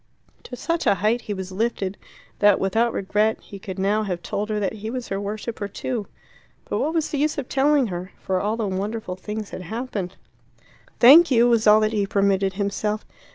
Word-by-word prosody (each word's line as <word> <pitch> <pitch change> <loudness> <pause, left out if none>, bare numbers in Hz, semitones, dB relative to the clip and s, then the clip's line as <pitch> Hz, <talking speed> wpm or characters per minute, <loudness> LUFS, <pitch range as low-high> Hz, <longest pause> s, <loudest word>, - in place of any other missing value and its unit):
To 250 - -7
such 335 +6 -2
a - - +5
height 220 +5 +1 0.2
was 190 -1 -5
he 185 - -9
lifted, 205 -3 -1 0.4
that 205 -1 +5
without 225 +5 +1
regret 210 +3 +1
he 200 - -11
could 190 -1 -7
now 200 +3 +1
have 180 -5 -3
told 210 +2 -3
her 210 -1 -1
that 200 0 -1
he 220 0 -6
was 250 0 -5
her 195 0 -2
worshipper 210 +1 -4
too. 220 +1 -4 0.6
But - - -1
what 320 +2 -1
was 320 -2 0
the 290 - -1
use 300 +2 +1
of 275 -3 -3
telling 280 0 +3
her? 185 -2 -5
For 185 -1 -1
all 215 +2 -1
the 225 - -1
wonderful 195 0 -3
things 210 +3 -6
had - - -6
happened. 205 -1 -5 0.8
"Thank 310 +8 +9
you," 240 -2 +5
was 230 -2 +3
all 210 +1 +7
that 215 +1 +1
he 205 -2 0
permitted 195 -1 +1
himself. 210 +2 -2
210 Hz, 200 wpm, -23 LUFS, 195-235 Hz, 0.8 s, Thank